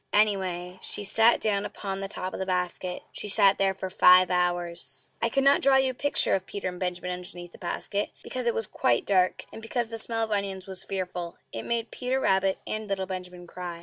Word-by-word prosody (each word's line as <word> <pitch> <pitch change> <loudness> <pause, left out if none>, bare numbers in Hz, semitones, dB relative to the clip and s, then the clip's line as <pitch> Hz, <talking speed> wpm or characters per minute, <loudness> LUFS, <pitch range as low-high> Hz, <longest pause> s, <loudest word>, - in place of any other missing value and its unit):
Anyway, 185 -4 +1
she - - -5
sat 225 +4 +4
down 205 -2 +1
upon 195 -2 -5
the 195 - -3
top 185 -2 -5
of - - -5
the - - 0
basket. 180 0 -2
She 210 - -5
sat 195 0 +5
there 195 -1 +2
for 190 0 -5
FIVE 180 0 +7
HOURS. 175 -6 -1
I 230 - +2
cannot 275 +3 +4
draw 270 0 +5
you 265 -1 +4
a - - -10
picture 285 +3 +1
of 190 -1 0
Peter 200 -2 -3
and 180 0 -8
Benjamin 180 0 -2
underneath 175 -1 -7
the - - -15
basket, 200 +3 -2
because 255 -1 -3
it 235 - +2
was 225 - -1
quite 120 -9 +1
dark, 185 -2 +2
and - - -8
because 230 +1 -2
the 225 -1 -5
smell 225 0 0
of 220 - -3
onions 195 -2 -1
was 190 -1 -6
fearful; 180 -3 -4 0.2
it 115 - -5
made 235 -1 -1
Peter 255 +1 -1
Rabbit 190 -5 +2
and 215 0 -3
little 195 -1 -1
Benjamin 180 -1 -7
cry. 175 -1 -7
190 Hz, 215 wpm, -27 LUFS, 180-220 Hz, 0.2 s, FIVE